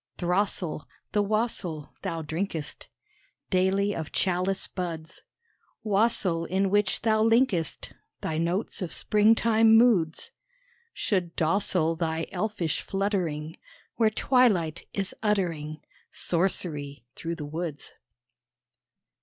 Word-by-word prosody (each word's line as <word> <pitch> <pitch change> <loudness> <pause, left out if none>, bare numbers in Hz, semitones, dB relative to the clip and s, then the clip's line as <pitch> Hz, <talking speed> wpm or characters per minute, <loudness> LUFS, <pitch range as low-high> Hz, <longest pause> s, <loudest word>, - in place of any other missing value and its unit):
Throstle, 180 -3 -1 0.2
the 210 - +2
wassail 205 -7 -2
Thou 165 -4 -3
drinkest 160 -1 -4 0.6
Daily 195 +2 +2
of 160 -2 -5
chalice 185 +1 0
buds 165 -4 -5 0.6
Wassail 200 -5 +2
in 190 +2 0
which 205 0 +1
thou 220 -1 +3
linkest 225 - +1 0.3
Thy 160 0 -2
notes 175 +6 -1
of 180 - -3
springtime 220 +1 +4
moods 195 -10 +3 0.6
Should 180 - -1
docile 165 -1 +1
thy 165 -1 -1
elfish 185 -4 -2
fluttering 175 -6 -2 0.4
Where 220 -1 +4
twilight 215 - +2
is 195 -2 -3
uttering 165 -8 -1 0.3
Sorcery 150 - -1
through 170 +3 -4
the 150 -3 -6
woods. 155 -1 -5
185 Hz, 100 wpm, -27 LUFS, 165-210 Hz, 0.6 s, springtime